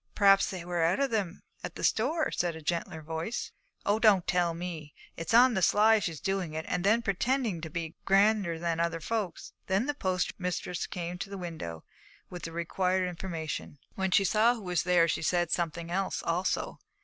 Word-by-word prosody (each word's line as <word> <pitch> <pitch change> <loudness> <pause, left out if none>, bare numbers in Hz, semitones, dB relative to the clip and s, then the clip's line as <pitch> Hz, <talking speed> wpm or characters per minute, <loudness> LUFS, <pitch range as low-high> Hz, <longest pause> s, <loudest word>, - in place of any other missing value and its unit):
'Perhaps 195 -1 +5
they 180 -3 -6
were 175 -1 -1
out 165 +7 +2
of 275 -2 +1
them 200 -5 -2 0.2
at - - -6
the - - -7
store,' 310 +8 +1
said 175 -2 -1
a 160 - -8
gentler 165 -1 -2
voice. 165 +8 -4 0.3
'Oh, 205 +2 +2
don't 205 -6 +5
tell 175 -2 +1
me. 165 -4 -6 0.2
It's 165 -1 -5
on 245 +2 +7
the 190 - 0
sly 215 +4 +5
she's 165 -7 -3
doing 195 -5 -2
it, 160 - -3
and 175 - -1
then 220 +4 +3
pretending 220 -2 0
to 160 - -5
be 165 0 -4
grander 195 -3 +3
than 165 0 -1
other 170 0 0
folks.' 205 -1 -3
Then 195 +5 +1
the 290 - -1
postmistress 180 -5 -2
came 175 0 -5
to 195 - -5
the 200 - -6
window 160 - -6 0.5
with 180 -1 -7
the 165 - -5
required 180 +2 0
information. 165 -5 -5 0.2
When 190 0 -1
she 195 - +4
saw 220 +5 +4
who 225 - -9
was 180 -2 0
there, 175 -1 +4
she 165 - -1
said 175 +1 +1
something 170 0 -2
else 190 +1 -1
also. 175 +3 -1
180 Hz, 195 wpm, -29 LUFS, 170-200 Hz, 0.5 s, on